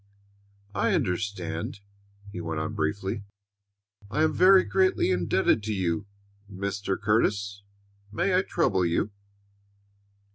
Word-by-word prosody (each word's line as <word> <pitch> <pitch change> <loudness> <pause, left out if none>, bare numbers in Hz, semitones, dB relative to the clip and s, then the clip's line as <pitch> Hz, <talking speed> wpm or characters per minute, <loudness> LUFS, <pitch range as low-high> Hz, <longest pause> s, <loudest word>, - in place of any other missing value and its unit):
"I 95 - +1
understand," 90 -1 -2 0.5
he 90 - -6
went 80 -2 -3
on 80 - -3
briefly. 95 +7 -2 0.9
"I 150 +8 +1
am 155 -1 +2
very 190 +2 +6
greatly 185 - +2
indebted 90 +4 +2
to 110 - -1
you, 95 +1 -1 0.4
Mr. 100 0 -3
Curtis. 100 -2 +1 0.5
May 185 - 0
I 185 - +4
trouble 105 - +1
you?" 85 +4 0
100 Hz, 110 wpm, -27 LUFS, 90-110 Hz, 0.9 s, very